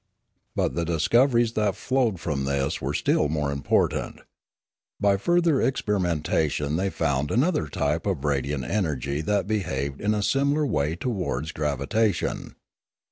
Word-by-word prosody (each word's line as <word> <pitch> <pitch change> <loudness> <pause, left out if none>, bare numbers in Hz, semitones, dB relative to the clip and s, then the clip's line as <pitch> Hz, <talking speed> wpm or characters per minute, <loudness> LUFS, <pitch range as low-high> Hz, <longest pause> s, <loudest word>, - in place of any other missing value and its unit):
But - - 0
the 85 - -1
discoveries 115 - +3
that 105 -3 +1
flowed 125 -8 0
from 75 -6 -2
this 70 0 -1
were - - -2
still 75 - +2
more 75 -2 -1
important. 70 0 0 0.8
By 100 -1 +3
further 170 - +2
experimentation 80 - 0
they 95 +3 0
found 70 -4 -1
another 130 - +1
type - - -1
of 65 - -1
radiant 70 -1 -1
energy 75 - -1
that 100 +3 0
behaved 70 -10 -2
in 105 +1 +1
a 105 - -1
similar 140 +5 +2
way 80 - 0
towards 90 - -2
gravitation. 75 - -1
85 Hz, 135 wpm, -25 LUFS, 70-110 Hz, 0.8 s, discoveries